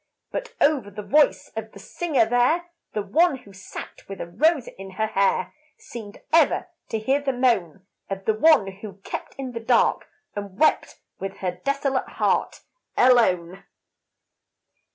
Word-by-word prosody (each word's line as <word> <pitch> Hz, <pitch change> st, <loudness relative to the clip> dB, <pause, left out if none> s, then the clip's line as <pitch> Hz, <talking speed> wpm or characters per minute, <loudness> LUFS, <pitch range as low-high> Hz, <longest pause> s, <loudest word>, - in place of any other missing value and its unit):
But -, -, -5 dB
over 285 Hz, -8 st, +2 dB
the 205 Hz, +1 st, -8 dB
voice 295 Hz, +6 st, +3 dB
of 220 Hz, 0 st, -6 dB
the -, -, -12 dB
singer 285 Hz, -, 0 dB
there, 255 Hz, +10 st, +2 dB, 0.2 s
The 210 Hz, -, -1 dB
one 330 Hz, -, +3 dB
who 200 Hz, -6 st, -16 dB
sat 190 Hz, +1 st, -10 dB
with 195 Hz, -, -7 dB
a -, -, -3 dB
rose 290 Hz, -, +2 dB
in 195 Hz, 0 st, -10 dB
her 220 Hz, +3 st, 0 dB
hair, 195 Hz, -3 st, +1 dB, 0.2 s
Seemed 220 Hz, -3 st, -10 dB
ever 330 Hz, +2 st, +4 dB, 0.2 s
to 225 Hz, -, -1 dB
hear 265 Hz, +6 st, +1 dB
the 280 Hz, -1 st, 0 dB
moan 215 Hz, -8 st, 0 dB, 0.2 s
Of 195 Hz, 0 st, -5 dB
the 220 Hz, -, +3 dB
one 260 Hz, 0 st, +5 dB
who 200 Hz, -2 st, -9 dB
kept -, -, -6 dB
in 265 Hz, -2 st, -5 dB
the 235 Hz, -, -5 dB
dark 230 Hz, +1 st, +2 dB, 0.3 s
and 200 Hz, -2 st, -6 dB
wept 310 Hz, -, +2 dB, 0.2 s
With 195 Hz, 0 st, -5 dB
her 185 Hz, -2 st, -2 dB
desolate 275 Hz, -1 st, 0 dB
heart -, -, 0 dB, 0.4 s
alone. 190 Hz, -8 st, +3 dB
225 Hz, 155 wpm, -24 LUFS, 195-280 Hz, 0.4 s, one